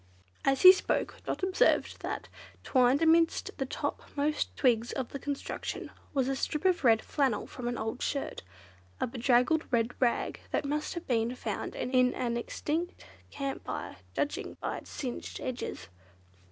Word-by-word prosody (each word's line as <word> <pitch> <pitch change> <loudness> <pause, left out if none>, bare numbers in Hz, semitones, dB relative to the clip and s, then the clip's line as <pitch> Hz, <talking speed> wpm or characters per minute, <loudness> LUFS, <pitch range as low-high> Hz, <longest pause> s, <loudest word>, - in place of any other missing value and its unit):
As 270 -1 +2
he 370 - +14
spoke, 380 - -1
Dot - - -2
observed 375 +7 +2
that, - - -4 0.4
twined 260 +3 +4
amidst 330 0 +4
the 270 - -1
topmost 295 +3 -2
twigs 240 -3 +3
of 260 -3 -3
the 275 - -6
construction 285 +1 -4 0.2
was 265 -3 +1
a 270 - 0
strip 300 +4 -2
of 365 -4 +3
red 225 -3 +5
flannel 270 -7 0
from 245 -2 -6
an 240 -1 -1
old 225 +3 -3
shirt, 280 - -2 0.6
a - - +1
bedraggled 250 +5 +3
red 235 -1 +1
rag 240 -2 +1
that - - 0
must 300 +4 -2
have 340 - -5
been 235 0 +1
found - - -4
in 255 0 +2
an 235 -2 -1
extinct 310 +8 -3 0.2
camp 275 -1 -4
fire, - - -5 0.2
judging 290 - -2
by - - -3
its - - -15
singed 255 -5 -5
edges. 240 - -4
270 Hz, 155 wpm, -30 LUFS, 245-300 Hz, 0.6 s, he